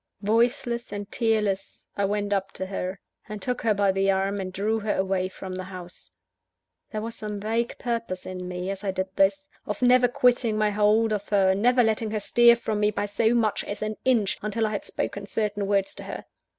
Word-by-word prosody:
Voiceless 235 +2 +1
and 205 -1 -6
tearless, 210 -4 -1
I 200 - +1
went 205 0 -1
up 195 -1 -1
to 190 - -4
her, 190 0 -4 0.3
and 210 -1 -5
took 250 +3 -2
her 220 -2 +2
by 200 -1 +3
the 195 +1 +1
arm, 195 +1 +1
and 185 -1 -4
drew 210 +4 0
her 210 0 -1
away 190 -1 0
from 190 0 -8
the 185 0 -5
house. 180 -2 -10 0.8
There 215 -1 -3
was 230 0 -4
some 210 -2 -5
vague 225 +3 -1
purpose 230 -7 -3
in 185 -1 -6
me, 180 +1 -3
as 195 +1 -6
I 200 - -1
did 190 0 -3
this, 290 +10 +2 0.2
of 210 +4 -3
never 250 0 +6
quitting 245 -2 +2
my 215 -1 +2
hold 215 +2 +3
of 205 -1 -3
her, 195 -2 +4
never 245 +5 +4
letting 220 0 0
her 215 0 -1
stir 235 +3 +6
from 220 -3 -2
me 210 0 +3
by 205 0 -2
so 220 +3 +1
much 220 -3 +1
as 205 +1 -4
an 215 0 -2
inch, 230 -7 +2
until 215 +2 -1
I 215 - -1
had 205 - -3
spoken 200 0 -4
certain 205 -2 -1
words 195 -1 +1
to - - -9
her. - - -6
210 Hz, 215 wpm, -26 LUFS, 195-225 Hz, 0.8 s, never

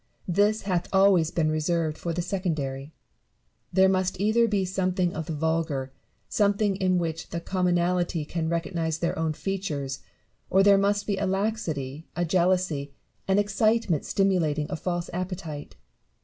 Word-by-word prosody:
This 205 +4 +2
hath 180 -3 -1
always 190 -4 +4
been 155 -2 0
reserved 155 0 0
for 170 - -4
the 170 +1 -2
secondary. 155 -7 -3 0.8
There 190 +1 +5
must 185 -1 0
either 220 +3 +3
be 200 -3 +1
something 185 -1 0
of 160 -1 -5
the 160 - -3
vulgar, 155 -4 -1 0.3
something 205 -1 +2
in 185 -1 +2
which 165 -2 -3
the 170 - -3
common 180 0 0
alty 175 -3 0
can 160 -1 -2
recognise 165 -1 -1
their 170 +1 -1
own 160 -1 0
features, 150 -8 -3 0.5
or 195 +1 +4
there 200 0 +6
must 205 +1 +1
be 200 -2 -1
a 195 - 0
laxity, 170 - -2
a 175 - 0
jealousy, 170 -5 +1 0.3
an 190 0 +3
excitement 205 -4 +2
stimulating 170 -7 +1
a - - -1
false 175 0 -3
appetite. 175 -5 -5
175 Hz, 150 wpm, -26 LUFS, 160-195 Hz, 0.8 s, there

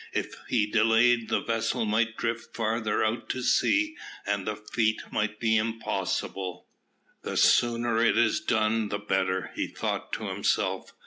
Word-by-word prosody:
If - - -2 0.2
he 110 -4 +2
delayed, 115 +2 +3
the - - +1
vessel 115 0 -1
might 110 +1 0
drift 115 0 -3
farther 110 -1 0
out 110 +2 -2
to 130 - -2
sea, 315 - +2 0.3
and 100 -1 -1
the 110 - -1
feat 110 +1 0
might 105 0 -1
be 110 -1 +2
impossible. 110 -4 -2 0.6
"The - - -4
sooner 115 -1 +3
it 115 - +3
is 115 -2 +3
done, 110 0 +1
the 100 - -1
better," 95 -2 -1
he - - -2
thought - - -4
to - - -3
himself. - - -1
110 Hz, 150 wpm, -27 LUFS, 105-115 Hz, 0.6 s, delayed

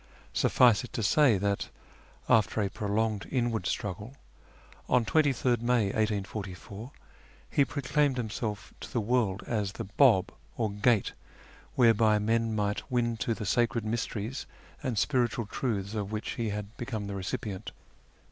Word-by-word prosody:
Suffice 125 -1 +4
it 125 - -10
to 115 - -2
say, 130 +1 +5
that, 100 +1 -1 0.6
after 110 0 +3
a 100 -2 0
prolonged 105 0 -1
inward 120 -7 0
struggle, 105 +7 -4 0.7
on 125 -2 +3
23rd 125 -2 +2
May 120 -2 +2
1844 105 +1 -3 0.6
he 140 - +4
proclaimed 140 0 0
himself 105 -3 -4
to - - -8
the 120 - 0
world 110 -4 0
as 105 -4 -1
the - - -5
Bah 105 -1 +4 0.3
or 110 -3 0
Gate 105 +1 +2 0.6
whereby 115 -3 +5
men 115 +1 +1
might 105 +4 -2
win 120 -2 +1
to 115 0 -1
the 105 - -5
sacred 120 +1 +1
mysteries 115 +2 -3 0.3
and 130 -6 -2
spiritual 120 -1 +1
truths 100 -3 -2
of 105 -2 -3
which 110 0 -3
he 115 -2 -2
had 105 +2 -5
become 115 -4 -4
the 100 - -5
recipient. 95 +1 -4
110 Hz, 140 wpm, -29 LUFS, 105-120 Hz, 0.7 s, say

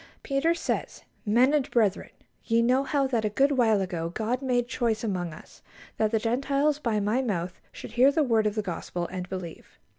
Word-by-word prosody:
Peter 295 +4 +1
says: - - -3 0.2
"Men 245 +7 +4
and 295 -4 +1
brethren, 215 -5 +1 0.3
ye 230 0 +2
know 255 +3 +3
how 275 0 +1
that 240 -4 0
a 215 - +1
good 275 +7 +2
while 230 -6 +3
ago 170 -3 -3
God 220 +7 -2
made 245 -2 0
choice 230 -2 -1
among 180 -6 -2
us, 155 - -14 0.4
that 220 - +2
the 225 - +1
Gentiles 275 +6 0
by 230 -7 0
my 210 +5 +1
mouth 185 -7 -3
should - - -9
hear 250 +4 +5
the 310 +1 +2
word 225 -5 +2
of 210 - -2
the 215 - -1
Gospel, 175 -1 -4
and 180 -1 -5
believe. 185 -4 -8
230 Hz, 200 wpm, -27 LUFS, 205-265 Hz, 0.4 s, hear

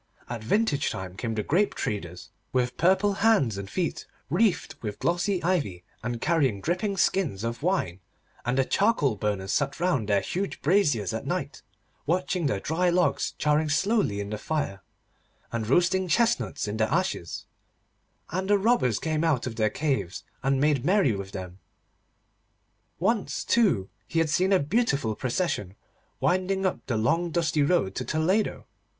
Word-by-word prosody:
At 120 -2 -5
vintage 150 - +1
time 95 -1 -6
came 115 +1 -3
the 105 - -1
grape 190 - +1
treaders, 90 -4 -4 0.2
with 125 -1 0
purple 190 +4 +3
hands 205 - +4
and 100 0 -6
feet, 175 - -2 0.2
wreathed 220 -5 +2
with 105 -2 -4
glossy 175 +2 0
ivy 140 - 0 0.2
and 120 0 -3
carrying 140 -8 +1
dripping 185 - -1
skins 160 - +1
of 115 +2 -3
wine; 150 - 0 0.4
and 120 +2 -1
the 135 - +3
charcoal 170 - +2
burners 100 -2 -2
sat 140 +2 0
round 145 - 0
their 100 -1 +3
huge 190 - -3
braziers 145 - +2
at - - -4
night, - - -3 0.5
watching 180 0 0
the 105 -8 0
dry 175 - +1
logs 180 +1 +1
charring 150 +1 +2
slowly 190 - +1
in 100 0 -4
the 105 - -3
fire, 125 - -2 0.7
and 115 -2 -2
roasting 180 +7 +3
chestnuts 235 - +1
in 105 +1 -3
the 110 +1 +1
ashes, 170 - -1 0.9
and 190 +3 -2
the 205 - +5
robbers 195 - +2
came 155 -1 -1
out 155 -7 +1
of 120 -3 -4
their 110 -1 +2
caves 135 - -2 0.2
and 135 0 +1
made 145 -3 +2
merry 180 - +3
with 100 -1 -6
them. 95 -2 -7 1.4
Once, 210 +4 0
too, 180 - +3 0.2
he 165 - -4
had 165 -2 +2
seen 185 +4 +2
a 195 - +6
beautiful 150 - +1
procession 120 - -2 0.4
winding 185 +1 +1
up 185 - -1
the 120 -4 0
long 165 +11 +1
dusty 160 -2 +1
road 145 - +2
to 125 - -3
Toledo. 180 +10 0
150 Hz, 160 wpm, -27 LUFS, -, 1.4 s, a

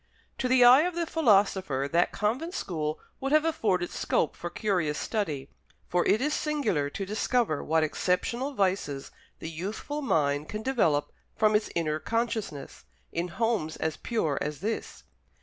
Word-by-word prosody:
To 255 - +1
the 255 0 +5
eye 250 +3 +9
of 350 +1 -1
the 340 -1 0
philosopher 195 - +2
that 170 +1 +3
convent 260 - -1
school 155 -3 -3 0.2
would 270 +1 -2
have 310 +1 +4
afforded 195 - 0
scope 155 - 0
for 175 - -5
curious 175 -8 0
study; 155 - -2 0.4
for 175 0 +2
it 215 - +4
is 300 +2 +1
singular 240 - 0
to 195 +7 -4
discover 210 -3 0
what 160 0 +2
exceptional 235 - -1
vices 185 - -1 0.3
the 160 - -6
youthful 205 - -4
mind 145 - +1
can 215 +1 -5
develop 170 - +1 0.2
from 215 -1 +3
its 210 - +1
inner 155 -2 0
consciousness, 220 - -3 0.3
in 170 +2 -2
homes 200 -4 -1
as 160 -1 -2
pure 160 -12 -1
as 150 +1 -3
this. 220 +3 -4
195 Hz, 155 wpm, -28 LUFS, 155-240 Hz, 0.4 s, eye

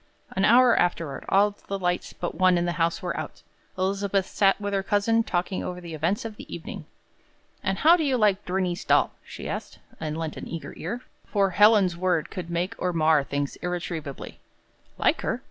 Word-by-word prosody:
'" - - -35
An 190 +1 +3
hour 245 +1 +6
afterward, 165 -4 -1
all 205 +2 +4 0.2
the 195 - -2
lights 180 -1 -1
but 175 - -4
one 185 -1 +4
in 175 - +1
the 175 - 0
house 165 0 +1
were - - -2
out. - - -6 0.3
Elizabeth 195 0 0
sat 195 +1 +2
with 205 0 -3
her 195 - +1
cousin 205 +3 +2
talking 185 -3 -2
over 180 0 -5
the 170 -2 -8
events 170 +8 -1
of 220 -2 -6
the - - -11
evening. - - -7 0.8
"And 195 -1 -1
how 320 - +6
do 325 - 0
you 270 -3 +2
like 210 -4 +2
Bernice 180 0 -1
Dahl?" - - +3
she - - -8
asked, - - -5 0.2
and 155 -1 -3
lent 160 -2 -4
an - - -7
eager 165 -1 -6
ear; 235 +9 -5 0.3
for 200 -2 +1
Helen's 205 -2 +5
word 175 -2 0
could 175 -2 -6
make 170 +2 -1
or 180 -1 0
mar 155 -3 +4
things 140 0 -3
irretrievably. 170 -5 -5 0.6
"Like - - +2
her? - - -1
185 Hz, 195 wpm, -26 LUFS, 170-200 Hz, 0.8 s, hour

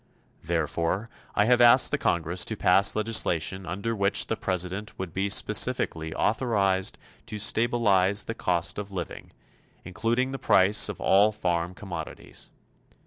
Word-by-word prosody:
Therefore, 85 +5 -2 0.3
I 105 - +3
have 125 +1 +3
asked 120 -1 +6
the - - +1
Congress 85 +1 0
to 110 - -3
pass 100 +2 +3
legislation 95 -5 0
under 100 +7 -3
which 100 -1 +1
the 115 - -2
President 95 +1 -4
would 95 -3 -6
be 95 +2 -1
specifically 80 -4 +1
authorized 100 -4 0 0.3
to 110 -2 -6
stabilize 105 -3 +2
the 115 - -5
cost 90 -4 -1
of 100 -1 -7
living, 90 -3 -7 0.5
including 120 +8 -1
the 135 - -5
price 105 -2 +3
of 105 - -6
all 100 +3 +4
farm 90 -3 -2
commodities. 95 -3 -7
100 Hz, 140 wpm, -26 LUFS, 90-110 Hz, 0.5 s, asked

